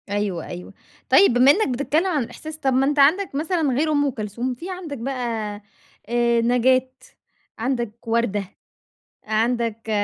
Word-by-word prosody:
أيوه، 200 -5 -2
أيوه. 180 0 -8 0.4
طيب 395 - +6
بما 250 +3 +6
إنك 435 +8 +1
بتتكلم 285 +6 0
عن 305 -8 0
الإحساس، 310 +6 -9
طَب 270 -4 0
ما 260 +1 +3
أنت 290 +1 0
عندك 320 +4 +3
مثلًا 330 +4 -1
غير 295 +5 +1
أم 290 -1 +2
كلثوم، 235 +2 -4
في 340 +10 -8
عندك 355 -6 -6
بقى، 235 -4 -3 0.5
آآ، 235 0 +2
نجاة، 250 +2 +3 0.7
عندك 235 -2 -3
وردة، 225 -3 0 0.8
عندك 225 0 -1
250 Hz, 145 wpm, -22 LUFS, 230-285 Hz, 0.8 s, طيب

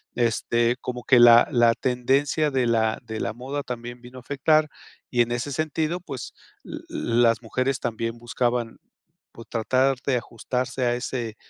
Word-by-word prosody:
este, 120 0 +1
como 125 -1 -5
que 130 - +5
la 120 0 +8
la 120 -3 +4
tendencia 135 +4 +1
de 130 -2 +1
la 110 -1 +1
de 110 -2 -6
la - - -2
moda 135 +5 -5
también 120 -1 -7
vino 125 +1 -11
a - - -13
afectar 150 +4 +2 0.4
y 120 - +3
en 120 0 0
ese 120 +4 -3
sentido, 155 +4 -1
pues, 140 -8 -7 0.3
uh - - -11
uh, - - -5
las 115 0 +1
mujeres 130 +3 -1
también 115 0 -3
buscaban, 120 0 -2 0.5
por 115 - -11
tratar 130 +4 +1
de 135 - +1
ajustarse 125 +2 -3
a 120 0 +1
ese 120 -3 -4
125 Hz, 165 wpm, -24 LUFS, 120-135 Hz, 0.5 s, la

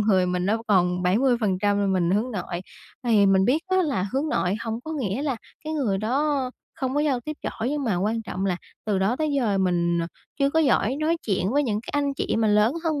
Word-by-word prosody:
người 195 -4 +3
mình 180 0 -1
nó 220 +3 0
còn 180 -3 +3
70% 205 -1 +2
là 200 - +1
mình 185 -3 +1
hướng 215 +6 +1
nội. 180 -5 -4 0.4
Thì 215 -4 +4
mình 190 -1 +4
biết 280 +9 +2
á, 375 0 +1
là 275 - 0
hướng 275 +4 0
nội 185 -9 0
hổng 225 0 -3
có 320 - -5
nghĩa 260 -4 -2
là 280 -4 -1 0.3
cái 310 - -3
người 245 -11 0
đó 265 +4 0 0.2
không 260 -1 -3
có 290 - +2
giao 285 -5 +1
tiếp 305 +5 -6
giỏi 230 - -3
nhưng 290 -1 -2
mà 215 -7 +1
quan 215 +5 0
trọng 195 -2 -3
là 185 -2 0 0.3
từ 210 -3 0
đó 195 +6 +1
tới 310 0 -1
giờ 215 -7 +1
mình, 170 -2 +1
ờ, 165 - -2 0.3
chưa 275 -1 +3
có 320 - +1
giỏi 265 -4 +2
nói 320 +2 +2
chuyện 190 -2 0
với 290 +2 +3
những 215 -6 -1
cái - - -8
anh, 285 -1 0
chị - - -1
mà 220 -1 +2
lớn 210 +3 +4
hơn 310 -3 0
225 Hz, 240 wpm, -25 LUFS, 195-275 Hz, 0.4 s, Thì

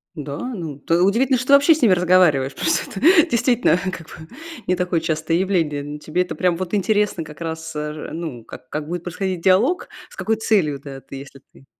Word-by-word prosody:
Н-да, 145 -2 -6
ну, 170 - -5
т 165 +4 0
удивительно, 240 +7 +2
что 255 - -5
ты 280 - +4
вообще 285 +4 +7
с 315 - -4
ними 220 -7 +5
разговариваешь, 175 -7 +3
потому - - -2
что - - -2
это, 335 - +5
действительно, 240 -5 +2
как 170 -3 -9
бы 160 0 -11 0.4
не 185 - +2
такое 180 -1 0
частое 160 0 -1
явление. 170 -6 0
Ну, 145 +1 -7
тебе 155 +4 -2
это 180 - -3
прям 180 -2 +1
вот 185 +3 -3
интересно 210 -3 0
как 150 0 -13
раз, 160 -1 -5
э, 150 0 -3
же, 155 - -8
ну, 160 -8 -6
как 130 - -12
как 150 0 -4
будет 175 +1 -4
происходить 180 0 -3
диалог, 205 - +2 0.2
с - - -16
какой 210 +4 0
целью 205 -9 +1
это 135 -1 -9
ты, - - -11
если 135 0 -10
ты 135 - -20
175 Hz, 220 wpm, -21 LUFS, 150-205 Hz, 0.4 s, вообще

